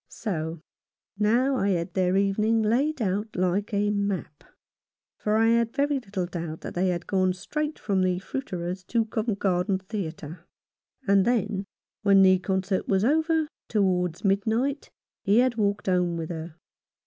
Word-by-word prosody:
So 160 -5 -4 0.6
now 245 +6 +3
I 200 - +1
had 175 -1 -1
their 185 0 +2
evening 215 +3 +2
laid 260 +5 +1
out 205 +3 -2
like 185 +4 0
a 205 0 +1
map; 200 -7 -3 0.8
for 210 0 +1
I 225 +1 +4
had 230 0 +2
very 285 0 +1
little 195 -6 -4
doubt 170 -3 -6
that - - -6
they 185 +2 +1
had 175 -1 -1
gone 185 -1 +1
straight 300 - -3
from 195 -3 0
the 185 -1 +1
fruiterer's 185 -4 -5
to 230 +2 +1
Covent 220 -1 -2
Garden 190 0 +1
Theatre. 175 -4 -6 0.6
And 200 -1 +5
then, 210 -4 0 0.4
when 200 -2 +6
the 185 -1 +5
concert 190 0 -1
was 195 +1 +2
over, 315 +3 +2 0.2
towards 180 -4 0
midnight, 225 +8 0 0.3
he 200 +3 +3
had 250 -1 +3
walked 205 -1 0
home 180 -2 +1
with 160 -1 -4
her. 160 -1 -6
195 Hz, 155 wpm, -26 LUFS, 180-225 Hz, 0.8 s, when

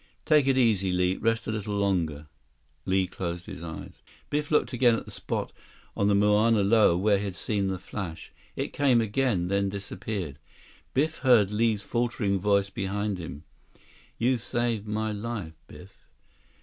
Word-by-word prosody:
"Take 150 -4 +4
it 135 -1 +3
easy, 105 -7 +3
Li. 90 +1 +1
Rest 115 0 0
a - - -2
little 105 -1 -3
longer." 85 -7 0 0.6
Li 95 0 +2
closed 85 -1 -5
his 95 -5 -8
eyes. 80 -2 -8 0.3
Biff 150 0 -1
looked 150 - +2
again 120 -1 +4
at - - -5
the - - -10
spot - - -4 0.4
on 100 - +1
the 100 - +4
Mauna 105 +1 +4
Loa 105 -4 +4
where 100 +1 +3
he - - -4
had 95 -2 -4
seen 100 -2 -1
the 95 -1 -2
flash. 90 -3 -7 0.2
It - - -3
came 135 -4 +3
again, 110 -4 +1
then 100 +1 +1
disappeared. 95 -5 -5 0.6
Biff 155 +4 +1
heard 115 -7 +4
Li's 105 -1 +1
faltering 115 -4 0
voice 100 0 +2
behind 100 0 -2
him. 80 -3 -7 0.7
"You 125 +1 +2
saved 115 -2 -1
my 110 +1 -1
life, 105 -5 -5
Biff." 90 +2 -13
105 Hz, 160 wpm, -27 LUFS, 95-115 Hz, 0.7 s, Take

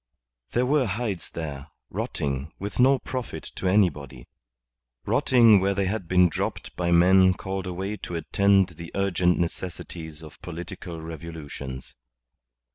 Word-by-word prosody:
There 125 +1 +2
were 135 -1 +2
hides 100 -3 -3
there, 75 -3 -6 0.2
rotting, 70 +2 -3
with 100 +4 -6
no 135 +2 +6
profit 130 -1 -5
to 95 - -1
anybody 75 -11 +1 0.8
rotting 115 -5 +5
where 100 +1 +1
they 100 0 +1
had 100 -2 -2
been 90 0 +5
dropped 80 - -4
by 85 -1 0
men 95 +2 +6
called 95 0 -4
away 95 +4 -3
to 85 - -6
attend 95 +3 +3
the 85 0 -10
urgent 90 -2 +2
necessities 85 -2 -5
of 75 - -13
political 85 0 -7
revolutions. 80 -5 -7
90 Hz, 130 wpm, -26 LUFS, 80-100 Hz, 0.8 s, no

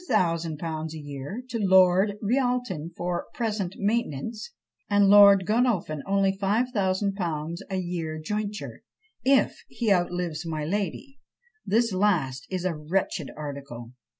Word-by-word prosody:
_ 165 - -1
a - - -7
year 145 - -7
to 235 -2 -3
Lord 190 +1 +4
Rialton 245 - 0
for 175 0 -2
present 210 -6 -2
maintenance; 215 - -2 0.4
and 205 -1 +4
Lord 200 -2 +8
Godolphin 210 - +1
only 195 0 +2
5000_l._ 195 -6 -1
a 190 - -2
year 170 -3 -3
jointure, 210 +5 -4 0.4
if 270 +1 +2
he 225 -4 +1
outlives 175 -3 -1
my 155 -2 -3
lady: 205 - -3 0.5
this 230 0 +2
last 165 -9 +1
is 185 -1 -3
a 185 - +1
wretched 155 0 -2
article. 140 -5 -7
190 Hz, 120 wpm, -26 LUFS, 160-210 Hz, 0.5 s, Lord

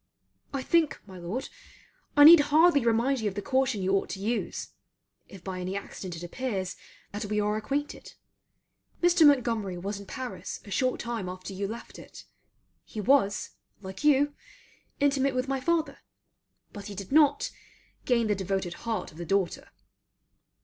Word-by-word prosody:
I 275 -2 -3
think, 335 -1 +2
my 190 -3 -11
Lord, 190 +10 -4 0.7
I 290 - +9
need 330 +2 +11
hardly 295 0 +4
remind 235 +4 +2
you 220 - -1
of 195 - -3
the 205 - -3
caution 260 -6 +1
you 190 - +1
ought 195 - -1
to 190 - -5
use, 225 +4 -3 0.6
if 190 -3 -12
by 185 -1 -5
any 185 +2 -4
accident 185 -3 -7
it 165 - -8
appears 190 -1 -3 0.4
that 205 +1 -4
we 210 +1 -1
are 210 0 +1
acquainted. 275 +7 -4 0.9
Mr. 350 -3 +6
Montgomery 230 -9 +2
was 200 +3 -4
in 200 - -11
Paris 255 +2 -6
a 200 - -11
short 255 +5 0
time 230 -6 -4
after 185 +2 -7
you 195 +1 -3
left 230 +3 -8
it. - - -12 0.6
He 215 - -8
was, 205 -2 +2 0.3
like 190 +8 -8
you, 290 0 +4 0.7
intimate 275 -2 +2
with 255 +1 -1
my 270 0 -1
father; 325 +3 0 0.7
but 205 -1 -8
he 205 - -7
did 195 +3 -8
not, 290 -1 +4 0.5
gain 235 -2 +2
the 210 - +2
devoted 190 -2 -2 0.2
heart 225 - -2
of 155 - -14
the - - -4
daughter. 190 +1 -1
225 Hz, 165 wpm, -28 LUFS, 195-275 Hz, 0.9 s, need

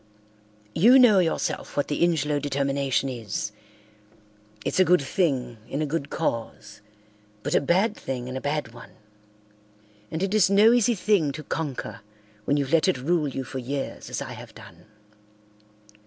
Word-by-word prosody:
You 235 +10 +6
know 235 -7 +7
yourself 165 -4 -2
what 145 - +1
the 145 - 0
Ingelow 150 -4 +1
determination 140 -1 0
is. 110 -4 -4 1.1
It's - - -1
a - - +8
good 180 -4 +3
thing 135 - -1
in 140 - -3
a 155 - 0
good 145 -1 -3
cause 110 -7 -4 0.6
but - - -2
a - - +4
bad 190 +9 +2
thing 125 -2 -5
in 130 - -6
a 130 - -4
bad 145 -5 -2
one. 120 - -13 1.2
And 160 +4 -3
it 195 +1 -1
is 210 -4 +4
no 210 +4 +6
easy 245 -1 +3
thing 190 -7 +2
to 155 +2 -7
conquer 145 -9 -4 0.4
when 145 - +2
you've 140 +1 -2
let 165 +1 +4
it 185 - +2
rule 155 +4 0
you 135 -1 -4
for 130 +1 -6
years 135 +2 -5
as - - -3
I - - -8
have - - -12
done. - - -14
145 Hz, 165 wpm, -25 LUFS, 135-180 Hz, 1.2 s, a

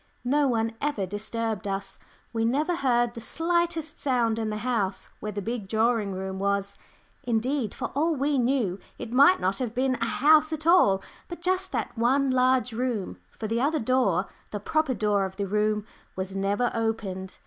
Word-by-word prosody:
No 285 +3 +3
one 225 -2 0
ever 285 -10 -1
disturbed 215 +2 -3
us 195 0 -4 0.3
we 225 -1 0
never 295 +9 +1
heard 240 -4 +2
the 230 - -8
slightest 330 +2 -1
sound 235 -5 +1
in 220 -1 -1
the 210 - -3
house 210 -6 -1
where 210 - -4
the 205 -1 -4
big 225 -2 -4
drawing 220 -1 +1
room 190 0 -4
was; 200 0 -1 0.4
indeed, 240 0 -1
for - - -4
all 315 +4 +1
we 280 0 +1
knew, 240 -7 +1 0.2
it 225 - -7
might 280 +8 +6
not 190 +1 0
have 245 -3 -3
been 260 +1 +2
a - - +2
house 310 +5 +4
at 310 -1 -4
all, 200 - +5 0.2
but 345 - -7
just 370 +2 0
that 235 -2 -2
one 260 +4 +2
large 255 -2 +2
room, 235 -4 -2 0.2
for 220 - -5
the 230 +2 0
other 305 +4 +2
door 220 - +2 0.2
the 210 - -4
proper 305 +5 0
door 210 -3 +1
of 190 0 -4
the 200 0 -2
room 210 +1 0 0.3
was 190 +1 -4
never 200 +5 0
opened. 205 -5 -3
230 Hz, 180 wpm, -26 LUFS, 205-275 Hz, 0.4 s, might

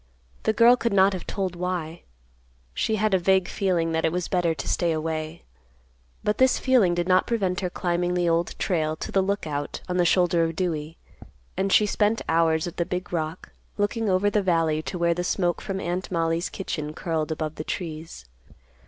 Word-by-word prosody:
The 220 - +4
girl 235 +3 +6
could 235 -3 -1
not 195 0 +5
have 185 - -6
told 190 -3 -2
why. 175 -2 -3 0.7
She 220 - 0
had 215 -1 +1
a 190 - +4
vague 190 0 +3
feeling 175 -4 0
that 160 0 0
it 160 - +2
was 180 0 -2
better 175 -3 +1
to 140 - -6
stay 170 -1 +1
away. 155 +1 -3 0.8
But 210 - 0
this 260 0 +4
feeling 235 -10 +3
did 175 0 -1
not 185 0 +3
prevent 195 -6 0
her 185 - -2
climbing 175 0 -1
the 175 -1 +1
Old 170 0 0
Trail 155 -4 0
to - - -6
the 195 - +3
Lookout 160 -7 -3
on 180 -1 -2
the 175 - +4
shoulder 175 -1 +3
of 165 0 -2
Dewey, 160 -3 -3 0.6
and 195 +1 0
she 210 - +5
spent 210 +2 +1
hours 160 -1 +2
at 175 - -7
the 170 - +2
big 180 0 -4
rock, 160 +1 -3 0.3
looking 210 +1 0
over 190 +2 +2
the 210 - +2
valley 165 -4 +1
to 145 +3 -5
where 170 0 +2
the 175 +1 -3
smoke 175 -1 0
from 195 -1 -4
Aunt 180 +1 -3
Mollie's 165 0 0
kitchen 155 -5 -5
curled 160 -2 -2
above 155 -1 -3
the 155 - -6
trees. 160 - -6
175 Hz, 195 wpm, -25 LUFS, 165-190 Hz, 0.8 s, girl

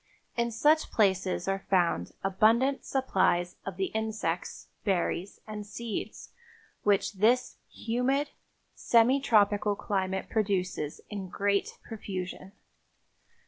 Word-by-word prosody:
In 235 0 +1
such 295 +8 +3
places 190 -4 +1
are 195 0 -1
found 170 - +1
abundant 225 +8 +3
supplies 185 -9 +1
of 190 -2 -5
the 190 -1 -1
insects, 220 -6 -3 0.2
berries 190 -1 -1
and 215 -1 -6
seeds 215 +2 -6 0.5
which 205 0 +2
this 230 +6 +2
humid, 255 +5 -1 0.4
semi 235 +4 +4
tropical 210 -4 +3
climate 190 -2 -2
produces 185 -8 -1
in 195 -3 -5
great 200 +2 0
profusion. 190 -3 -6
205 Hz, 100 wpm, -29 LUFS, 190-230 Hz, 0.5 s, semi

